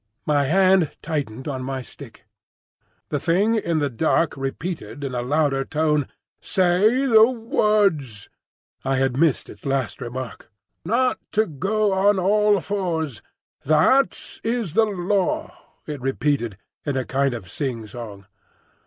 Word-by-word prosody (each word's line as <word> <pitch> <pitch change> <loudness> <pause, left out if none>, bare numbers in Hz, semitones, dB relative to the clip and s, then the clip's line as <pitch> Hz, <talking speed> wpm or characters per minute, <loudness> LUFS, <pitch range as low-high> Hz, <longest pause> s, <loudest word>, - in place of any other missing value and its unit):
My 145 -2 +2
hand 185 0 +3
tightened 140 -6 -3
on 135 -3 -3
my 130 0 -4
stick. - - -13 0.8
The 145 - -1
thing 190 +8 +2
in 170 -7 0
the 145 -2 +1
dark 160 +5 +1
repeated 145 +2 -5
in 135 -2 -3
a 120 - -1
louder 140 +1 +1
tone, 150 -1 0 0.3
"Say 195 +8 +2
the 225 -3 +7
words." 205 - +1 0.6
I 135 0 0
had 130 -1 +1
missed 150 0 +2
its 105 - -13
last 135 -7 -2
remark. 120 -1 -6 0.3
"Not 250 +7 +1
to 220 0 +3
go 200 +6 0
on 195 +1 +3
all 205 +2 +3
fours; 160 - -2 0.4
that 155 - +2
is 225 -7 -1
the 225 - +4
Law," 195 -1 -1 0.3
it 145 -4 -6
repeated 135 -5 -1 0.3
in 145 -3 -2
a 130 - -1
kind 135 -1 0
of 100 -6 -8
sing 120 -2 -3
song. 105 -2 -9
155 Hz, 135 wpm, -23 LUFS, 135-195 Hz, 0.8 s, the